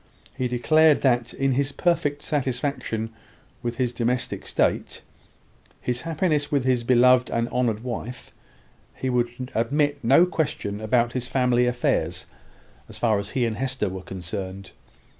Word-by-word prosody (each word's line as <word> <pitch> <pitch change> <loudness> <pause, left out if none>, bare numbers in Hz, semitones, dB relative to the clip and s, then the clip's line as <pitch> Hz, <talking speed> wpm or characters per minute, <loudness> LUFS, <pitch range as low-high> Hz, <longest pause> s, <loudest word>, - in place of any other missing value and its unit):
He 130 - -1
declared 155 +5 +4
that, 120 -3 +2
in 135 0 0
his 140 +2 0
perfect 160 -4 0
satisfaction 125 -5 -2 0.5
with 120 -1 -3
his 125 -2 0
domestic 125 +1 -2
state, - - 0 0.8
his 125 -1 -2
happiness 155 -3 0
with 140 -3 +2
his 125 -2 +2
beloved 125 +1 +5
and 115 0 0
honoured 120 -3 0
wife, 125 0 -6 0.6
he 130 - -2
would 120 +1 -2
admit 145 +5 +1
of 140 - -29
no 135 +9 +6
question 150 - -2
about 120 +2 +1
his 125 -1 -3
family 125 -2 +2
affairs, 90 -8 0 0.6
as - - -9
far 110 -4 +2
as 100 0 -5
he 125 - +3
and 110 -2 -2
Hester 130 -6 -1
were 95 0 -6
concerned. 95 +1 -6
125 Hz, 145 wpm, -24 LUFS, 115-135 Hz, 0.8 s, no